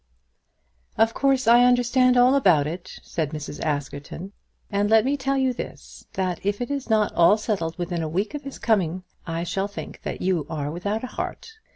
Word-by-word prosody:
"Of 225 Hz, +1 st, +3 dB
course 270 Hz, -3 st, +1 dB
I 240 Hz, +1 st, +7 dB
understand 250 Hz, +1 st, +4 dB
all 250 Hz, +2 st, +6 dB
about 180 Hz, -, +4 dB
it," 170 Hz, +4 st, -6 dB
said 155 Hz, -3 st, -2 dB
Mrs. 150 Hz, -1 st, -6 dB
Askerton; 145 Hz, +4 st, -4 dB, 0.4 s
"and 205 Hz, 0 st, +1 dB
let 220 Hz, +1 st, +5 dB
me 275 Hz, +2 st, +2 dB
tell 275 Hz, 0 st, -1 dB
you 260 Hz, -1 st, +2 dB
this, -, -, -9 dB
that 185 Hz, -2 st, -2 dB
if 205 Hz, +1 st, -1 dB
it 245 Hz, +3 st, -3 dB
is 275 Hz, -3 st, -3 dB
not 215 Hz, -2 st, +2 dB
all 175 Hz, +5 st, +5 dB
settled 190 Hz, -7 st, -2 dB
within 175 Hz, -1 st, -2 dB
a 160 Hz, -, -2 dB
week 195 Hz, +7 st, -1 dB
from 295 Hz, -, -5 dB
his 275 Hz, -1 st, -8 dB
coming 195 Hz, -8 st, +2 dB
here, 185 Hz, +1 st, -7 dB, 0.3 s
I 165 Hz, -, -1 dB
shall 190 Hz, +3 st, -1 dB
think 205 Hz, -, -8 dB
that -, -, -5 dB
you 180 Hz, -6 st, 0 dB
are 150 Hz, -2 st, -3 dB
without 200 Hz, +7 st, -3 dB
a 255 Hz, -, -6 dB
heart. 450 Hz, -, -6 dB
205 Hz, 200 wpm, -24 LUFS, 170-245 Hz, 0.4 s, I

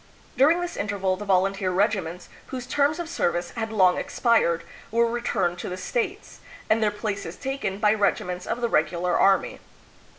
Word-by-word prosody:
During 305 Hz, +7 st, +4 dB
this 350 Hz, 0 st, -4 dB
interval 195 Hz, -2 st, -1 dB
the 210 Hz, -, -7 dB
volunteer 195 Hz, 0 st, +1 dB
regiments, 185 Hz, -3 st, -1 dB, 0.2 s
whose 255 Hz, -2 st, -6 dB
terms 290 Hz, +4 st, +1 dB
of 345 Hz, -2 st, -4 dB
service 175 Hz, -, -1 dB
had 225 Hz, -2 st, -4 dB
long 185 Hz, -4 st, +4 dB
expired, 220 Hz, -9 st, +1 dB, 0.3 s
were 235 Hz, +1 st, +3 dB
returned 215 Hz, -7 st, -1 dB
to -, -, -5 dB
the 180 Hz, -, -5 dB
States, 400 Hz, -, -3 dB, 0.3 s
and 220 Hz, +1 st, +4 dB
their 215 Hz, -, +3 dB
places 205 Hz, -4 st, -4 dB
taken 265 Hz, -7 st, -3 dB
by 210 Hz, 0 st, +3 dB
regi 210 Hz, -2 st, +1 dB
ments 180 Hz, 0 st, -6 dB
of 240 Hz, -, -2 dB
the 235 Hz, -, +2 dB
regular 180 Hz, -5 st, +1 dB
army. 195 Hz, -1 st, +3 dB
205 Hz, 170 wpm, -25 LUFS, 185-240 Hz, 0.3 s, During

